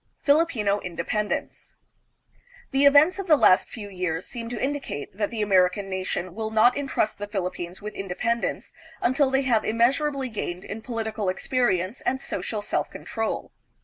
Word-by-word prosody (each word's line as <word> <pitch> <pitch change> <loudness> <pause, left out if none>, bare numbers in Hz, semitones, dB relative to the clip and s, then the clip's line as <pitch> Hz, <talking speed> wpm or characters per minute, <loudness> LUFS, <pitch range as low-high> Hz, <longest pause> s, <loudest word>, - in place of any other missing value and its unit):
Filipino 285 -10 +3
Independence. 185 +4 -3 1.0
The 270 +1 +3
events 290 +7 +6
of 390 - -4
the 310 -3 +6
last 185 -7 +5
few 215 -4 -7
years 180 -3 -3
seem 230 -1 -6
to 240 -2 -4
indicate 270 - -3
that 205 0 -1
the 220 -2 -2
American 195 0 +2
nation 185 -1 -3
will 220 +2 -3
not 220 +3 +4
intrust 270 -7 -1
the 205 - -4
Philippines 185 -2 -4
with 210 - -5
independence 230 +5 -2 0.3
until 265 +3 +2
they 270 +1 +2
have 235 -4 +2
immeasurably 265 +5 +1
gained 185 -4 -4
in 220 +2 -6
political 220 -4 -3
experience 190 0 0
and 265 - 0
social 215 -5 -4
self - - -1
control. 225 -1 -4
220 Hz, 150 wpm, -25 LUFS, 190-260 Hz, 1.0 s, events